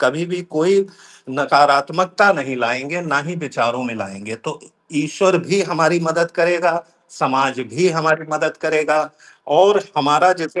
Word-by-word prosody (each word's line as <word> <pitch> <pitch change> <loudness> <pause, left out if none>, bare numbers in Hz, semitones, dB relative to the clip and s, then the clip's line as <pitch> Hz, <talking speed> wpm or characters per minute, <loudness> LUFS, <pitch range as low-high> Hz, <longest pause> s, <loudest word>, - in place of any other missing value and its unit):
कभी 155 +7 0
भी 180 0 -5
कोई 175 +3 +1 0.5
नकारात्मकता 145 +8 +3
नहीं 135 -5 -5
लाएँगे, 125 +8 -2
ना 155 -5 0
ही 165 +5 -7
विचारों 125 -5 -2
में 120 -2 -5
लाएँगे। 100 +1 -9
तो 150 +7 -8
ई - - -21 0.4
ईश्वर 180 +5 +2
भी 190 +3 -1
हमारी 170 -1 +1
मदद 170 +1 0
करेगा, 175 0 +2 0.4
समाज 135 -3 -1
भी 175 +10 +2
हमारी 160 -1 0
मदद 155 +1 -1
करेगा 155 -1 +1 0.6
और 200 +2 +6 0.2
हमारा 150 +5 +4
जैसे 165 +2 -5
155 Hz, 145 wpm, -18 LUFS, 140-175 Hz, 0.6 s, और